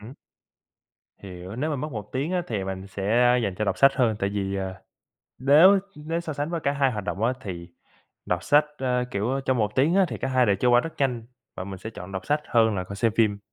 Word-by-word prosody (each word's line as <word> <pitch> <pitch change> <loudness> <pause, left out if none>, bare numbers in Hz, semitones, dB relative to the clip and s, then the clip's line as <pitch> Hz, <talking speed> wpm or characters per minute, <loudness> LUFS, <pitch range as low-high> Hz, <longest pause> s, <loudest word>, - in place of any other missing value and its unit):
Hứm? 115 +6 -11 1.1
Hiểu. 95 +2 -9
Nếu 155 +5 -1
mà 145 - -1
mất 150 +2 -5
1 105 -2 -6
tiếng 140 +7 -2
á, 180 -1 0
thì 105 -5 -3
mình 95 0 -5
sẽ, 100 +1 -4
a, 125 0 +5
dành 100 -6 -1
cho 105 - -2
đọc 100 - -1
sách 135 - +6
hơn, 115 -6 +1
tại 100 - 0
vì, 100 -1 -2
à, 95 -1 -4 0.6
nếu 155 +10 +6 0.2
nếu 160 +3 -3
so 160 -2 -5
sánh 145 +2 -3
với 170 -2 -2
cả 140 -1 0
hai 140 -2 +2
hoạt 105 -3 -5
động 100 - -4
á, 120 +3 +3
thì 90 -6 -7 0.6
đọc 90 +1 -1
sách, 150 +1 +4
a, 125 -1 0
kiểu, 105 +5 -1
ơ, 135 - -1
trong 130 -1 0
1 105 -1 0
tiếng 150 +7 +3
á 195 -1 +5
thì - - -5
cả 130 - -2
hai 130 -2 +3
đều 100 -1 +3
trôi 125 +4 +2
qua 120 0 +6
rất 165 - -6
nhanh 125 -5 -1 0.3
và 90 - -4
mình 95 -1 -7
sẽ 110 +4 -7
chọn 95 -3 -10
đọc 95 - -5
sách 150 +1 +1
hơn 110 -2 +3
là 90 - -2
còn 100 - -8
xem 115 +1 +1
phim. 105 -3 +2
120 Hz, 260 wpm, -25 LUFS, 100-140 Hz, 1.1 s, sách